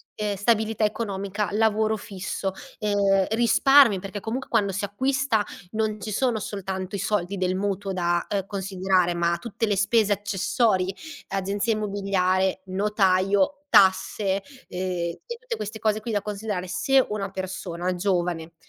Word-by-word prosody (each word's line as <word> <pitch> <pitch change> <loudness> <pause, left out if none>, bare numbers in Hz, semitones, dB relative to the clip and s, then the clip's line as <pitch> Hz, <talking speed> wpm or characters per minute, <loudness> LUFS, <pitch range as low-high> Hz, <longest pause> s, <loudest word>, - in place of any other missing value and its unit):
ehm, 210 -1 -2
stabilità 220 +1 +1
economica, 205 -1 -2
lavoro 220 0 +2
fisso, 195 -1 -4 0.3
ehm, 200 -2 +2
risparmi 240 -1 +5
perché 195 +2 -6
comunque 250 +4 -4
quando 205 -4 +2
si 195 +2 -2
acquista 260 0 0 0.3
non 215 -1 -1
ci 215 - -4
sono 240 +1 +1
soltanto 190 -1 -4
i - - -3
soldi 200 -1 -1
del 185 0 0
mutuo 195 0 -2
da, 175 -1 0
ehm, 195 -2 -1
considerare, 190 -2 0
ma 170 0 +1
tutte 225 +2 -3
le 205 - +1
spese 205 +1 +3
accessorie: 195 -1 0 0.3
agenzia 200 +3 -1
immobiliare, 195 -2 0
notaio, 195 +5 +2
tasse, 190 +1 +3 0.3
ehm, 180 - -5 0.4
e 475 -1 -6
tutte 480 0 -4
queste 215 +1 -5
cose 215 0 +1
qui 230 +1 -4
da 205 -2 0
considerare. 205 -3 -4
Se 265 +9 +3
una 200 -2 -3
persona 185 -2 -4
giovane 175 -3 -1
200 Hz, 140 wpm, -25 LUFS, 190-215 Hz, 0.4 s, risparmi